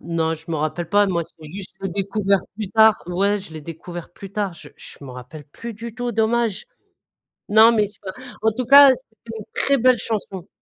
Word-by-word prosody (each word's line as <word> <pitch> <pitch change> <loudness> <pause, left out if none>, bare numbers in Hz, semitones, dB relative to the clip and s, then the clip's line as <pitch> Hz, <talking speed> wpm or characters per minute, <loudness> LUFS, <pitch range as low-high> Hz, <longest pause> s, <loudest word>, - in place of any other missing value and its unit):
Non, 165 -1 -1
je 160 0 -14
me 160 - -1
rappelle 155 +3 -3
pas. 205 0 +4
Moi 170 -3 0
c'est 160 -1 -12
juste, 190 +4 -8
j'ai 195 - -1
découvert 200 +1 0 0.2
plus 215 -3 -4
tard 220 0 +5
ouais 200 +3 +1
je 190 -4 -10
l'ai 155 - -7
découvert 170 +2 -9
plus 195 +2 -11
tard, 205 -3 -2
je 160 -3 -13
je - - -12
me 135 - -9
rappelle 125 +4 -10
plus 230 +11 -9
du 230 +1 -8
tout, 245 -1 -3
dommage! 225 - 0 0.8
Non, 220 +2 +7
mais 210 -2 +2
c'est 205 0 -14
pas 190 -2 -6 0.3
en 220 +1 +3
tout 245 +4 -4
cas, 280 +3 +9
c'est 235 -4 -12 0.2
une 215 - -7
très 280 0 +2
belle 255 0 +4
chanson. 200 -5 -4
200 Hz, 215 wpm, -21 LUFS, 170-220 Hz, 0.8 s, cas